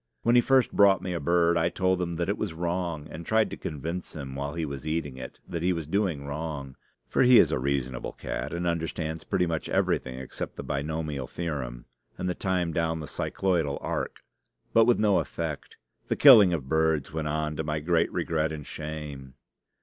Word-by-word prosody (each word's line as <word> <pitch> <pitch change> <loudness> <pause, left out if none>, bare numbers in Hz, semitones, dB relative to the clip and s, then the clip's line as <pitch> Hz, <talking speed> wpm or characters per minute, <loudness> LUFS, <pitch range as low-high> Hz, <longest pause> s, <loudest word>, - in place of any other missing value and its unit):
When 120 - +3
he 120 - +7
first 130 -1 +3
brought 95 -2 +5
me 90 -1 -2
a 85 - -2
bird, 85 +2 +3
I 85 +1 +2
told 95 0 +1
him 85 -1 -2
that 85 0 -1
it - - -1
was 80 - -3
wrong, 85 -2 -2
and 85 - -7
tried 110 +4 +2
to - - -4
convince 85 +5 -5
him, 70 -3 -6
while 70 +3 -4
he 85 -1 -1
was 70 -1 -6
eating 75 -4 -2
it, 65 -1 -9
that 85 -2 -4
he 90 +2 +2
was 80 -3 -4
doing 85 -4 -1
wrong; 70 -2 -5 0.3
for - - +1
he 125 -1 +7
is - - +6
a - - 0
reasonable 65 -2 -2
cat, - - -4
and 85 +1 -3
understands 80 -1 -2
pretty 90 - +1
much 80 -2 -3
everything 65 -1 0
except 65 0 -6
the - - -6
binomial 75 -2 -3
theorem 65 -8 -4 0.3
and 90 - -3
the 90 - 0
time 90 -3 -1
down 80 -1 0
the 75 - -6
cycloidal 85 -6 -1
arc. - - -4 0.5
But 115 0 +6
with 120 0 +4
no 105 -4 +3
effect. 75 -6 -5 0.3
The - - 0
killing 110 -10 +9
of 75 -7 -2
birds 80 -2 +1
went 80 -1 -2
on 75 0 -1
to 80 - -1
my 75 0 -2
great 85 +2 +1
regret 80 -1 0
and 75 -2 -6
shame. 75 -4 -7
80 Hz, 205 wpm, -27 LUFS, 75-90 Hz, 0.5 s, killing